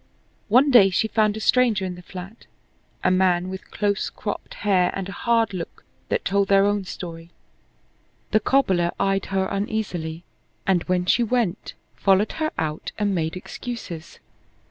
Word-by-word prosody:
One 255 +6 +5
day 215 -6 +8
she 205 +4 +1
found 215 -1 +1
a - - -4
stranger 225 -4 +3
in 185 - -3
the 180 - -10
flat, 185 +5 -10 0.6
a 185 - +3
man 185 -1 +2
with 190 0 -8
close 205 -1 -1
cropped 205 - -6
hair 185 -3 +4
and 195 -1 -3
a - - -6
hard 230 0 +1
look 175 -3 -7 0.2
that - - -1
told 200 +1 +2
their 195 0 +5
own 205 -1 0
story. 170 -2 -8 1.0
The 215 - +4
cobbler 195 -8 +2
eyed 195 0 +1
her 190 -1 0
uneasily, 190 -5 -3 0.4
and, 185 -3 +3
when 180 -1 0
she 235 - +3
went, 230 -5 -1 0.2
followed 195 +2 +3
her 310 - +2
out 155 -1 -3
and 205 -2 0
made 160 -2 -1
excuses. 185 -4 -7
195 Hz, 160 wpm, -23 LUFS, 180-215 Hz, 1.0 s, day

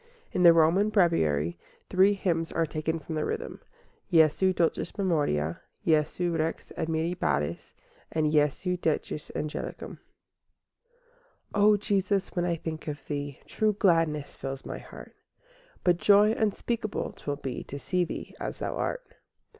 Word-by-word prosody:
In 185 - -1
the 170 -1 +9
Roman 165 +6 +4
Breviary 85 - +2 0.3
three 190 +2 +4
hymns 170 -4 -1
are 165 - +1
taken 155 +1 -2
from 160 0 -7
the 155 -1 -1
Rhythm, - - -4 0.5
Jesu 165 +3 +5
dulcis 175 +3 -1
memoria, 145 - 0 0.2
Jesu 165 +2 +1
Rex 160 0 -2
Admirabilis, 160 - -1 0.4
and 155 -1 +1
Jesu 150 +5 +1
decus 155 -2 -2
angelicum. 150 0 -5 1.5
I - - 0
O 210 0 +6
Jesus, 200 -1 0
when 175 -1 -1
I 170 -1 +1
think 160 -1 -6
of 145 -2 -5
Thee, 145 -2 -4
True 215 -1 +1
gladness 165 -7 +1
fills 135 0 -6
my - - -5
heart; - - -12 0.7
But 175 -2 +4
joy 205 +3 +5
unspeakable 220 0 -1
'twill 145 - -4
be 135 -3 -5
To 140 - -7
see 180 +5 0
Thee 170 - -6
as - - -4
Thou - - -3
art. - - -3
165 Hz, 140 wpm, -28 LUFS, 150-190 Hz, 1.5 s, the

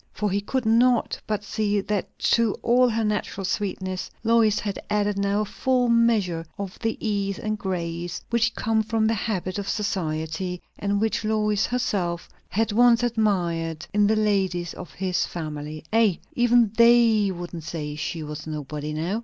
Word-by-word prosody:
For 210 -2 -1
he 200 +1 0
could 255 +4 -2
not 235 +2 +3
but 210 -1 -1
see 205 0 0
that 200 0 -3 0.2
to 230 -3 +3
all 250 +1 +4
her 225 0 0
natural 210 -2 -2
sweetness 185 -1 -3
Lois 225 -2 +4
had 200 -2 -3
added 205 -1 +1
now 200 +1 +1
a - - -1
full 250 +3 +1
measure 220 -8 +2
of 195 -2 -6
the 225 -1 -1
ease 200 -3 -1
and 215 0 -2
grace 175 -3 -3
which 235 -1 +2
come 220 0 +1
from 220 0 0
the 225 - +2
habit 195 -3 -2
of 200 0 -4
society, 180 -3 -2 0.2
and 200 0 0
which 220 +1 0
Lois 210 -1 +1
herself 185 -8 -1 0.2
had 225 +2 0
once 240 +2 +5
admired 175 -8 0
in 205 0 +4
the 220 - +3
ladies 190 -5 0
of 180 - -9
his 185 -1 -1
family. 155 -2 -6
"Ay, 220 -6 +4 0.2
even 240 -3 +4
they 235 -3 +5
wouldn't 175 -2 -6
say 150 -2 -5
she 155 +1 -4
was 150 +1 -7
nobody 150 0 -5
now!" 170 +8 -1
205 Hz, 165 wpm, -24 LUFS, 175-225 Hz, 0.2 s, once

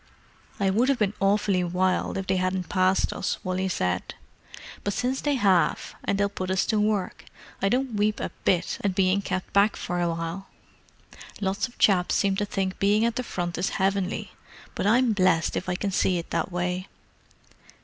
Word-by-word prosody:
"I 195 -1 +2
would 235 +7 +2
have 275 - +3
been 210 -3 +1
awfully 195 -1 +2
wild 180 +2 0
if 195 - -3
they 190 0 +1
hadn't 185 -1 -1
passed 185 0 +2
us," 195 - -2
Wally 185 0 -1
said. 90 - -2 0.7
"But 205 - -2
since 255 +2 -1
they 290 -1 +1
have, 195 -8 +2
and 200 - 0
they'll 200 0 +2
put 185 -2 -5
us 190 0 +1
to 215 - +1
work, 210 -3 -1 0.4
I 195 - +2
don't 255 +2 0
weep 210 0 +1
a - - -3
bit 180 -2 +1
at 195 -2 0
being 190 +1 +2
kept 185 -1 -4
back 200 +2 +4
for 175 0 -3
awhile. 170 +2 -3 0.9
Lots 200 +2 -1
of 245 - -19
chaps 180 -3 +3
seem 195 -1 +2
to 205 - 0
think 195 -2 -3
being 205 +3 +3
at 235 0 0
the - - -1
Front 175 -8 -4
is 185 - 0
heavenly, 195 0 -1 0.4
but - - -1
I'm 240 +1 +4
blessed 185 -5 +2
if 185 - -3
I 180 - 0
can 200 +2 -2
see 185 -1 +2
it 170 - -6
that - - -1
way. 180 +1 -2
195 Hz, 190 wpm, -26 LUFS, 185-205 Hz, 0.9 s, back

